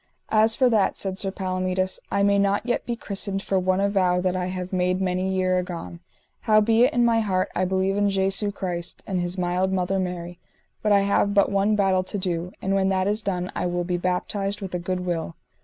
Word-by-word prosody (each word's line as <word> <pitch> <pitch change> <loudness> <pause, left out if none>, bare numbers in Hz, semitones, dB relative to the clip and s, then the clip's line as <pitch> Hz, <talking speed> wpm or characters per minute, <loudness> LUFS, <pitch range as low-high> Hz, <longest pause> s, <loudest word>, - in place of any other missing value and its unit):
As 220 +1 +4
for 260 - +4
that, 220 -5 +2
said 190 -1 -3
Sir 195 - 0
Palomides, 185 -1 -1
I 200 - +2
may 200 0 +3
not 200 +2 +1
yet 245 - -1
be 240 - -1
christened 200 -2 -2
for 195 - +1
one 185 +1 +1
avow 190 -3 +2
that 185 0 0
I 180 -1 -1
have 185 0 -5
made 180 0 +1
many 185 0 -1
years 185 -1 +1
agone; 165 - -7 0.4
howbeit 225 +2 +4
in 240 -1 +2
my 230 -1 +3
heart 185 -4 0
I 185 - +1
believe 190 +1 0
in 205 0 +2
Jesu 195 +1 +1
Christ 180 -3 -4
and 185 -3 -1
his 175 +1 -3
mild 180 +1 0
mother 190 +1 0
Mary; 175 -1 -4 0.4
but 210 - +1
I 200 -1 +5
have 200 0 +1
but 200 0 +4
one 200 +2 +2
battle 190 -2 +2
to 185 +3 -3
do, 180 -2 -2
and 195 - 0
when 195 -1 +2
that 190 0 +1
is 210 +2 +1
done 180 -3 -2
I 180 - -1
will 175 0 -1
be 175 0 -1
baptised 195 +3 -2
with 195 -3 -7
a 180 - -1
good 180 +1 -3
will. 170 -2 -3
190 Hz, 220 wpm, -24 LUFS, 180-200 Hz, 0.4 s, I